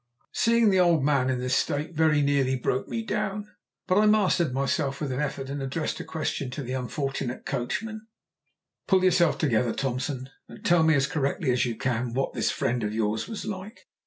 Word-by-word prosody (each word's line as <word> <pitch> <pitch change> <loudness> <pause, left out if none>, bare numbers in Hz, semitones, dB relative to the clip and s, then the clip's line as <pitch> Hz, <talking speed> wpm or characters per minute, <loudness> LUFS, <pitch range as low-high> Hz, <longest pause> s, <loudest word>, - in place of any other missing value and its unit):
Seeing 230 -2 +3
the 190 - +3
old 170 -5 +4
man 140 -3 +2
in 130 - +1
this 125 +1 0
state 145 +5 -1
very 155 -2 +3
nearly 140 -2 +2
broke 130 +1 -1
me 230 - -3
down, 210 -1 -2 0.4
but 185 +2 +3
I 215 - +4
mastered 190 -7 +3
myself 135 +1 -1
with 145 -3 -3
an 130 - -2
effort 140 -2 -3
and 140 +1 -4
addressed 140 +4 -3
a - - -4
question 150 -4 -3
to 130 +3 -5
the 125 +1 -4
unfortunate 130 0 -3
coachman 220 - -3 0.8
"Pull 190 -1 +4
yourself 175 -3 +4
together, 120 -5 +1
Thompson, 130 0 -3 0.2
and - - -13
tell 175 -1 +5
me 160 -1 +4
as 140 -1 +3
correctly 140 -2 0
as 125 0 +1
you 115 - -3
can 120 0 -2
what 135 - -1
this 115 - 0
friend 115 +3 -1
of 105 +1 -2
yours 110 0 -1
was 220 -3 -6
like." 210 +2 -6
140 Hz, 195 wpm, -26 LUFS, 125-175 Hz, 0.8 s, tell